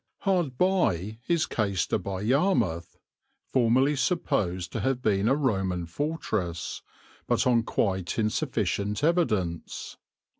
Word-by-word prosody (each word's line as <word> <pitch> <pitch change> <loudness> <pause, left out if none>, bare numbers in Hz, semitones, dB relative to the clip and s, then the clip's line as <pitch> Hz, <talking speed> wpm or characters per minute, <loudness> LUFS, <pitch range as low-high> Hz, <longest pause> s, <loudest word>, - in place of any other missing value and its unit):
Hard 175 -10 0
by 110 - +1
is 170 -2 +2
Caister 100 -5 0
by 95 -1 -4
Yarmouth, 115 - +1 0.6
formerly 130 +3 +3
supposed 105 - 0
to - - -3
have 130 -1 0
been 105 -4 +1
a 135 - +4
Roman 95 - 0
fortress, 105 - -3 0.5
but - - +2
on 120 -2 +4
quite 95 -5 -1
insufficient 105 0 -1
evidence. 105 - 0
110 Hz, 110 wpm, -27 LUFS, 95-145 Hz, 0.6 s, a